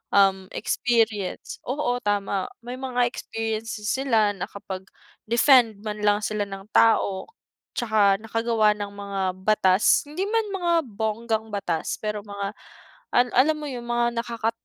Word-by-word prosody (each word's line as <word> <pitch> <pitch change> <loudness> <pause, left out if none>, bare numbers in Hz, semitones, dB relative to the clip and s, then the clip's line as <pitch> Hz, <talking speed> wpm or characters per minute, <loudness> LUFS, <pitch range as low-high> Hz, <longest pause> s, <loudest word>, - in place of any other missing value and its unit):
um, 190 -1 +4
experience 225 -4 0
oo 255 -2 0
tama 200 -1 0 0.2
may 245 +1 -6
mga 250 -2 +1
experiences 225 -2 -4
sila 225 -6 +2
nakapag-defend 215 +5 +1
man 210 0 -4
lang 205 0 +4
sila 210 -1 -1
ng 195 +1 -9
tao, 200 -4 +3 0.5
tsaka 210 -4 +3
nakagawa 225 -1 +2
ng 205 -1 -5
mga 200 -1 -5 0.2
batas, 195 -1 +4
hindi 330 +6 -3
man 450 0 +1
mga 350 -3 0 0.2
bonggang 220 +1 -2
batas, 170 -5 -2
pero 210 -1 -2
mga 200 0 -4 0.6
al 245 +1 +5
alam 300 +5 +5
mo 300 - -5
yung 240 -1 -6
mga 240 0 0
nakaka 230 -1 -2
220 Hz, 130 wpm, -25 LUFS, 200-240 Hz, 0.6 s, al